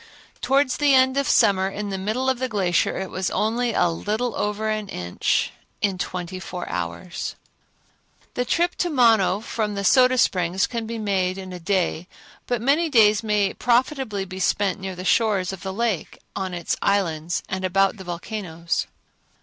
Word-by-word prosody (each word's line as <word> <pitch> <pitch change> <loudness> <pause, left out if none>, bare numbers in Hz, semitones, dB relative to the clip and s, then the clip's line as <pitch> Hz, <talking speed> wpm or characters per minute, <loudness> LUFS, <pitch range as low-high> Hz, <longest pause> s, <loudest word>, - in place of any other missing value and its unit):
Towards 270 +1 +2
the 290 -2 +4
end 260 0 +4
of 280 0 0
summer 190 -1 +4
in 205 +1 -5
the 195 - -2
middle 220 +7 -1
of 260 -2 +1
the 260 0 -1
glacier 190 -5 +1
it 190 -1 -4
was 185 0 -1
only 235 +3 0
a 180 - +3
little 215 +8 -2
over 210 +1 -2
an 215 -2 -2
inch 90 0 -1 0.3
in 195 -3 0
twenty 185 0 -4
four 180 -1 -6
hours. 90 - -4 1.0
The 245 - 0
trip 340 +8 +1
to 355 - 0
Mono 225 - +4
from 215 -2 -3
the 200 - -3
Soda 255 +4 +5
Springs 180 -4 +2
can 230 -2 -4
be 230 0 -4
made 190 -3 0
in 190 -1 -7
a 180 - -7
day, 180 -2 -1 0.4
but 240 -2 -1
many 305 +6 +2
days 215 -6 +5
may 210 -3 +1
profitably 245 -4 0
be 185 0 -8
spent 195 +1 +1
near 190 -1 -5
the 180 +1 -7
shores 195 -4 +2
of 190 - -8
the 190 - -4
lake, 215 -3 -2 0.2
out 190 - -2
on 185 - -6
its 170 - -2
islands 170 -5 0
and 190 0 -4
about 195 +3 +2
the 190 - -9
volcanoes. 170 -2 -3
200 Hz, 180 wpm, -23 LUFS, 185-235 Hz, 1.0 s, Soda